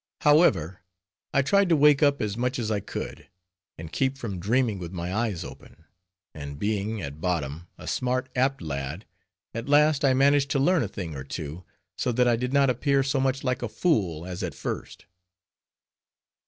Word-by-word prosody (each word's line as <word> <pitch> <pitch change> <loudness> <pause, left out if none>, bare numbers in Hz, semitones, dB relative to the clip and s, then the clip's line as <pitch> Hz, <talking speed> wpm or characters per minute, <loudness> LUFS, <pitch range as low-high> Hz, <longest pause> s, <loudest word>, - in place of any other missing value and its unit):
However, 95 - +4 0.5
I 140 - +3
tried 200 +6 +3
to 165 - +5
wake 150 -1 +5
up 145 -3 +3
as 105 -1 -2
much 125 +2 -1
as 110 -3 -2
I 105 - +1
could, - - -7 0.5
and 80 0 -8
keep 135 +5 0
from 105 -8 -5
dreaming 110 +1 +1
with 85 -2 -6
my 90 0 -4
eyes 105 -5 -1
open; 80 - -12 0.5
and 70 -2 -7
being, 105 +4 -1
at 70 +1 -7
bottom, 85 -2 -2
a - - -11
smart, 130 +1 -1
apt 130 -4 +1
lad, 70 +5 -4 0.5
at 115 +4 -5
last 150 0 +4
I 135 -2 +4
managed 140 +1 +4
to 140 - +2
learn 175 +4 +3
a 110 - -1
thing 90 -5 -6
or 65 - -5
two, 80 +4 -6 0.3
so 125 - +1
that 125 +1 +3
I 120 - +4
did 125 +2 -2
not 140 0 +4
appear 135 +2 +2
so 135 0 0
much 135 0 0
like 125 -2 -1
a 120 - -3
fool 95 - 0
as 90 +2 -6
at 85 -7 -4
first. - - -6
115 Hz, 185 wpm, -26 LUFS, 90-135 Hz, 0.5 s, to